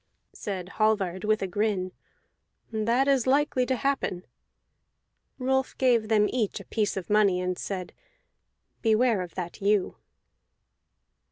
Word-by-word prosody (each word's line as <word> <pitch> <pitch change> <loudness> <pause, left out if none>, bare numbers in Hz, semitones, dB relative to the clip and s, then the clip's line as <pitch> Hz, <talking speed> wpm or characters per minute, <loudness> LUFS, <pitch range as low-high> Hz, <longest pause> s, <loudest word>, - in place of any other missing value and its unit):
Said 185 -3 -5
Hallvard 195 -4 +1
with 215 -1 +1
a - - -1
grin: 190 -1 -1 0.8
"That 230 +5 +1
is 270 -3 +2
likely 265 -2 +2
to 260 - +1
happen." 230 -8 -1 1.1
Rolf 265 0 0
gave 240 -4 +3
them 215 -1 +4
each 225 -5 -1
a - - -11
piece 210 -3 -1
of 185 - -4
money, 205 -3 +3
and 180 0 -1
said: 185 0 -5 0.9
"Beware 225 -2 +3
of 180 -2 -7
that 175 0 -6
ewe." 200 -1 +1
215 Hz, 125 wpm, -27 LUFS, 190-250 Hz, 1.1 s, them